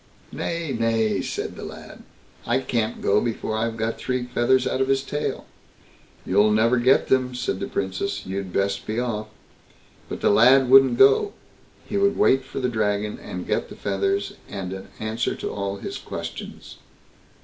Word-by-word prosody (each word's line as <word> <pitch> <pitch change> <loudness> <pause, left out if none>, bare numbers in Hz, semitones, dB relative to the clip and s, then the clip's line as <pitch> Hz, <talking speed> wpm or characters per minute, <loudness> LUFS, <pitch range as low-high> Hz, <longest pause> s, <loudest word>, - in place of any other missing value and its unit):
"Nay! 170 -4 -3
nay!" 115 -2 +1
said - - -4
the - - -8
lad; - - -10 0.5
"I 120 +2 +3
can't 120 -4 -2
go 100 +1 +3
before 110 -2 -2
I've 115 +1 -1
got 110 +1 -2
three 125 -1 -1
feathers 125 +1 +2
out 130 - 0
of 135 - +2
his 135 0 +1
tail." 145 +2 -3 0.8
"You'll 100 +3 +4
never 115 +4 +3
get 130 +3 +4
them", 130 -1 +1
said, 110 -6 -2
the - - -3
Princess; 100 - -3
"you'd 95 0 -4
best 100 +1 -1
be 110 +2 -1
off." 110 -3 -2 0.8
But - - -5
the - - +4
lad 125 +4 +5
wouldn't 135 -2 +7
go; 135 - +5 0.5
he 205 - -3
would 200 0 +2
wait 135 0 +4
for 135 - -6
the 125 - 0
Dragon, 105 -3 -1
and 90 0 -6
get - - -1
the - - -9
feathers, 100 0 -1 0.2
and 95 -2 -5
an 95 - -8
answer 110 +1 -2
to - - -5
all 100 -1 -3
his - - -6
questions. - - -8
115 Hz, 170 wpm, -24 LUFS, 100-130 Hz, 0.8 s, wouldn't